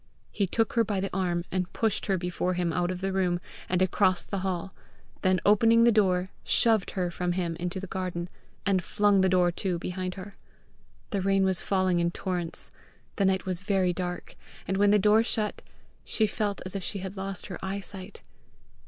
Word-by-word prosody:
He 200 -2 0
took 225 +4 0
her 230 - +4
by 205 -2 -1
the 190 -1 -3
arm, 175 -2 0
and 185 -1 -1
pushed 220 -3 0
her 195 -2 +2
before 180 +1 -1
him 175 -2 0
out 175 +1 0
of 185 0 -4
the 195 0 -1
room, 180 -2 +1 0.3
and 185 0 +2
across 185 -1 +2
the 200 - -3
hall; 190 0 -3 0.5
then 185 0 +3
opening 225 +3 +5
the 235 - +6
door, 190 -4 +2
shoved 220 -4 +4
her 180 -2 0
from 175 0 -1
him 175 -2 -2
into 180 +2 -3
the 195 - -5
garden, 180 -2 -3 0.4
and 190 -2 +2
flung 205 +1 +3
the 190 - +3
door 180 -1 +3
to 180 0 -2
behind 180 +1 -4
her. 195 +1 -9 0.7
The 200 - 0
rain 195 0 +2
was 190 -2 +1
falling 185 -2 +1
in 170 0 +2
torrents, 175 -1 -4 0.5
the 200 - +2
night 190 0 +1
was 185 -1 -2
very 190 -3 +1
dark, 180 0 -5 0.3
and 190 - 0
when 205 +1 +4
the 210 - +6
door 210 +2 +5
shut, 220 -2 -2 0.4
she 220 - +1
felt 205 -1 -2
as 185 - -4
if 195 - -2
she 200 - -4
had 190 0 -6
lost 195 -1 -4
her 180 - -7
eyesight. 195 0 -6
190 Hz, 195 wpm, -28 LUFS, 180-200 Hz, 0.7 s, the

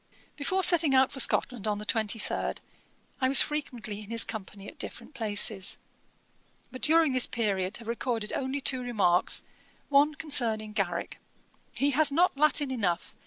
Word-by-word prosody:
Before 375 +6 -2
setting 325 -7 +3
out 260 0 +3
for 270 - -7
Scotland 240 -4 +2
on 210 -1 -1
the 210 - -8
23rd, 220 0 -1 0.6
I 260 - +2
was 270 - +9
frequently 240 -8 -6
in 210 - -13
his 230 0 +5
company 205 -2 -9
at - - -13
different - - -8
places, 210 -4 +2 0.9
but 255 - -10
during 320 -1 +3
this 255 -1 +2
period 200 -5 -2
have 230 - -14
recorded 230 -2 -4
only 270 +1 -3
two 260 -1 0
remarks: 200 -8 +1 0.5
one 290 +2 +3
concerning 230 -9 +1
Garrick: 180 -5 -4 0.6
'He 280 +1 0
has 290 +1 +2
not 340 +4 +1
Latin 290 -1 +1
enough. 185 -9 -3
245 Hz, 155 wpm, -27 LUFS, 210-280 Hz, 0.9 s, was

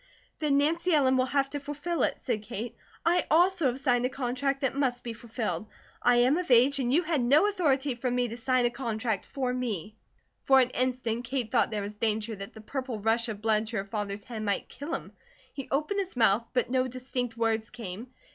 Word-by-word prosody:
"Then 295 -3 +2
Nancy 330 +4 +2
Ellen 265 -3 +4
will 255 0 +2
have 275 0 +1
to 290 - -2
fulfill 295 +4 -3
it," - - +1
said 230 -4 -2
Kate. 230 +2 -6 0.3
"I 345 +2 +3
also 350 -1 +4
have 255 +1 -1
signed 245 -2 +2
a 250 - +1
contract 270 +2 -1
that 270 - +1
must 260 -3 0
be 235 - -4
fulfilled. 225 -2 -4 0.3
I 245 0 +5
am 250 +7 +4
of 360 - -4
age, 260 +3 +5
and 245 -2 0
you 330 +6 +3
had 315 -4 0
no 290 +11 +5
authority 290 -9 +1
from 245 +1 -2
me 245 0 +1
to 230 - -5
sign 250 +1 +1
a 240 - +2
contract 230 -4 -2
for 260 -3 -2
me." 215 -6 -3 0.5
For 270 -1 +5
an 255 -1 +3
instant 250 -2 -1
Kate 245 -3 -2
thought - - +3
there 210 -2 -2
was 205 +1 -6
danger 220 0 -1
that 195 +2 -9
the 220 - -10
purple 255 0 -4
rush 225 +3 +1
of 210 -2 -5
blood 220 -1 +2
to 225 0 -3
her 195 - -2
father's 200 0 -4
head 230 -1 -6
might 205 -2 -1
kill 295 +4 -4
him. - - -7 0.4
He 275 - -6
opened 305 +9 0
his 380 -8 -3
mouth, 225 0 +3
but 250 -1 0
no 255 0 +2
distinct 250 -2 -4
words 225 -1 0
came. 225 -1 -7
250 Hz, 220 wpm, -28 LUFS, 225-275 Hz, 0.5 s, I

